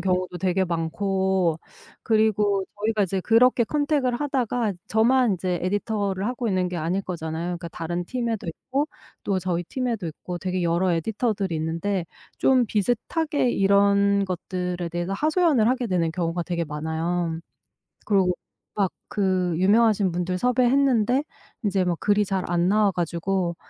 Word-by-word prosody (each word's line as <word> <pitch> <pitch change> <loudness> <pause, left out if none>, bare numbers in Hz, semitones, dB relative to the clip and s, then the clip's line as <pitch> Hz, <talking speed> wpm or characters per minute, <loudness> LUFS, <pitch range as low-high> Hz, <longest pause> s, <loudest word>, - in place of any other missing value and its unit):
경우도 180 0 -1
되게 190 +1 +1
많고 185 0 0 0.5
그리고 210 -3 +2 0.2
저희가 215 0 +1
이제 190 0 -1
그렇게 235 +5 +4
컨택을 285 -2 0
하다가 245 -5 -1
저만 235 0 +3
이제 180 0 -2
에디터를 200 0 -1
하고 245 0 -2
있는 185 -4 +1
게 180 - -4
아닐 170 +4 -1
거잖아요. 165 -2 -4
그러니까 170 0 -8
다른 175 +2 -4
팀에도 235 -2 -3
있고 265 - -2 0.4
또 190 -2 0
저희 175 -1 -2
팀에도 235 -3 -3
있고 175 +3 -6
되게 185 0 -2
여러 170 +2 +2
에디터들이 200 0 -1
있는데 170 +4 -2 0.3
좀 255 -3 +4
비슷하게 250 - 0
이런 200 0 +3
것들에 180 -1 -3
대해서 175 +2 -3
하소연을 305 - +2
하게 250 -2 0
되는 170 -4 0
경우가 170 0 -2
되게 170 -1 -2
많아요. 160 +2 -2 0.7
그리고 190 -3 +3 0.4
막 200 -3 +1 0.2
그 185 -3 0
유명하신 205 0 +3
분들 180 +1 -2
섭외했는데 250 +1 +3 0.4
이제 195 -3 +1
뭐 175 - +1
글이 205 0 +2
잘 190 -1 -1
안 175 0 +2
나와 205 0 +3
가지고 175 +1 -1
195 Hz, 330 characters per minute, -24 LUFS, 175-225 Hz, 0.7 s, 그렇게